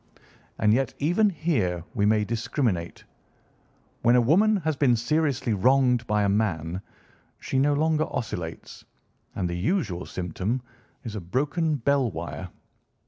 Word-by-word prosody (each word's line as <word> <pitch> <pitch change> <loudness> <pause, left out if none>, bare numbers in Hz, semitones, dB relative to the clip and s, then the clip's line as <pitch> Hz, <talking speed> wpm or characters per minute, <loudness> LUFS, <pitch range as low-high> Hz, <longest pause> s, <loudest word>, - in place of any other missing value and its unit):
And 105 -1 +3
yet 135 +3 0
even 175 +9 +2
here 130 - -1
we 105 -1 +1
may 105 0 +3
discriminate. 110 - -2 1.0
When 120 +1 +4
a - - +6
woman 195 - +4
has 160 -5 -1
been 135 -3 +3
seriously 130 0 0
wronged 125 +2 +3
by 105 0 +2
a - - +2
man 95 -4 -1 0.6
she 130 - -1
no 145 +1 +3
longer 155 +1 +2
oscillates, 85 - -5 0.5
and 90 -3 -1
the 85 - -3
usual 100 - -1
symptom 95 +8 -3 0.4
is 110 -3 -6
a 105 - -4
broken 150 - 0
bell 140 -1 +1
wire. 90 +1 -6
120 Hz, 140 wpm, -26 LUFS, 100-145 Hz, 1.0 s, a